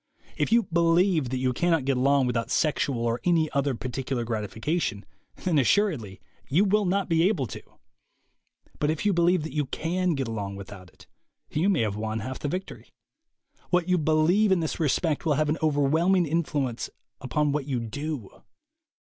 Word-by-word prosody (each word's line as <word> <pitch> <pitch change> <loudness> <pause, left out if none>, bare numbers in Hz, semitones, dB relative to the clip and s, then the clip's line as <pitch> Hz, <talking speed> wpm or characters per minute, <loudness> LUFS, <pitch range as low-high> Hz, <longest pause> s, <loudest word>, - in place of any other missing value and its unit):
If - - -1
you 235 0 +5
believe 170 -3 +2
that 130 - -2
you 130 0 0
cannot 165 0 +1
get 135 -1 +1
along 135 +1 +3
without 115 -2 -1
sexual 140 -6 0
or 115 +1 -1
any 165 -3 +2
other 140 -1 0
particular 130 0 -3
gratification, 110 - -2 0.3
then 170 -5 0
assuredly 135 - +1 0.3
you 175 +9 +3
will 210 +1 +2
not 195 +2 0
be 165 +1 +3
able 175 -11 -1
to. - - -8 1.2
But 150 - +1
if 160 +5 -2
you 205 - +3
believe 175 -1 +3
that 160 - -6
you 150 -2 -1
can 175 +3 -1
get 135 -3 -2
along 100 -3 -4
with 100 0 -9
out 90 -2 -13
it, 95 0 -19 0.5
you 170 +7 +1
may 195 - +2
have 105 -3 -1
won 110 +1 -3
half 130 +3 -5
the - - -3
victory. 185 +6 -6 0.8
What 180 -1 +1
you 180 -1 +2
believe 160 +7 +3
in 190 - +4
this 160 +1 -3
respect 155 0 0
will 155 -3 +2
have 155 +1 +1
an 155 - 0
overwhelm 155 +4 +2
ing 180 -2 +3
influence 145 -6 -1 0.3
upon 150 +2 0
what 145 -1 -2
you 130 -4 -1
do. 140 0 -6
150 Hz, 185 wpm, -26 LUFS, 125-170 Hz, 1.2 s, you